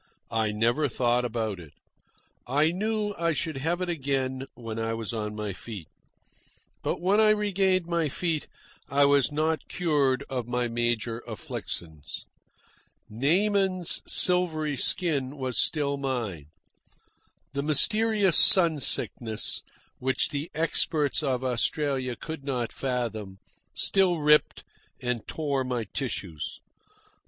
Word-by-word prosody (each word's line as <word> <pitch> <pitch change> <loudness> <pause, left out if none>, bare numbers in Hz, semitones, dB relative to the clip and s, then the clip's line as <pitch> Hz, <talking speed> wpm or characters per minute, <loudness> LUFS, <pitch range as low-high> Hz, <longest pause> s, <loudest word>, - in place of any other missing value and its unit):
I 110 -2 +1
never 120 +8 +1
thought 120 0 +1
about 110 -5 -2
it. 80 -4 -13 0.7
I 145 +5 +3
knew 210 +2 -1
I 170 -1 +1
should 155 0 -2
have 165 +6 -1
it 180 - -1
again 135 -4 -2
when 115 -2 -6
I 115 0 -1
was 115 0 -4
on 105 -1 -3
my 105 -2 -4
feet. 95 -3 -8 0.9
But - - -2
when 190 +4 +2
I 215 - +5
regained 195 -3 +2
my 170 -3 0
feet 165 0 -2 0.4
I 140 0 +4
was 140 -1 +3
not 155 +2 -1
cured 145 -6 +1
of 125 -3 -4
my 120 0 -1
major 120 -1 -1
afflictions. 80 -8 -6 0.9
Naaman's 185 - +1
silvery 160 -5 +2
skin 145 -1 -1
was 130 -3 -3
still 140 -3 +1
mine. 120 - -3 1.1
The 140 - -1
mysterious 205 +5 +4
sun 170 -5 +7
sickness, 110 -4 +1 0.4
which 130 +1 +1
the 145 +3 -4
experts 155 -2 +2
of 130 -4 -1
Australia 130 +1 0
could 160 +3 -7
not 125 -4 -2
fathom, 115 -7 -3 0.4
still 190 -3 +2
ripped 150 0 +3 0.4
and 125 -2 -3
tore 140 -4 -1
my 125 -2 -2
tissues. 95 - -4
140 Hz, 125 wpm, -27 LUFS, 120-165 Hz, 1.1 s, sun